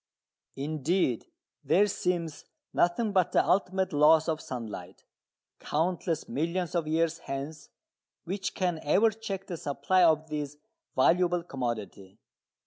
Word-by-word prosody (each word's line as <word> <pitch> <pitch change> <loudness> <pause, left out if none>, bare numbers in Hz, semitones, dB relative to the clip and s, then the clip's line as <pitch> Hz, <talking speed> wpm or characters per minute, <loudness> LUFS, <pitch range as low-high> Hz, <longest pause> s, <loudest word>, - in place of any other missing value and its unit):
Indeed 150 - 0 0.4
there 200 +3 +4
seems 175 -5 -2 0.3
nothing 205 +6 +2
but 185 -4 +2
the - - +4
ultimate 190 -2 +1
loss 155 +2 +5
of 160 -1 -1
sunlight, 105 -7 -7 0.5
countless 165 0 -1
millions 170 +6 -2
of 170 -3 0
years 165 +1 +1
hence, 140 +3 -6 0.5
which 190 +1 -3
can 180 -3 0
ever 215 +9 +4
check 200 -3 -5
the 175 -3 -5
supply 175 +4 +1
of 160 -2 +4
this 150 -1 -4 0.4
valuable 175 +5 +3
commodity. 115 - -5
165 Hz, 120 wpm, -29 LUFS, 145-180 Hz, 0.5 s, loss